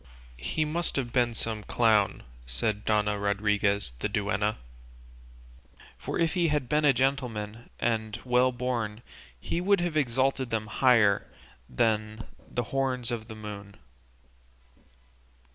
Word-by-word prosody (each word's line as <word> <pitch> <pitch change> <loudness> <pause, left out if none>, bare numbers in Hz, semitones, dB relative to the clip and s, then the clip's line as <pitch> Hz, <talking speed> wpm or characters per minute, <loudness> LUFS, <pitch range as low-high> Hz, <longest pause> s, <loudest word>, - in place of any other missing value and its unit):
"He 155 - -1
must 165 +3 -1
have 120 -4 -2
been 120 -2 +2
some 110 -1 -2
clown," 110 -5 +2 0.2
said 100 - -2
Dona 105 -1 +1
Rodriguez 100 - +1
the 105 - -1
duenna; 105 0 0 1.4
"for - - -4
if 165 -1 +1
he 175 -3 +2
had 150 -4 0
been 150 +2 +2
a 145 - +7
gentleman 120 -4 -2
and 110 -2 -1
well 125 +1 +3
born 120 -3 -3 0.4
he 170 - -2
would 200 +1 +3
have 175 -2 -1
exalted 130 -1 +1
them 110 -1 -1
higher 105 -3 +3 0.4
than 110 - 0 0.2
the 120 - -1
horns 130 -3 0
of 110 -2 -4
the 110 - -8
moon." 105 -2 -8
115 Hz, 125 wpm, -28 LUFS, 105-130 Hz, 1.4 s, a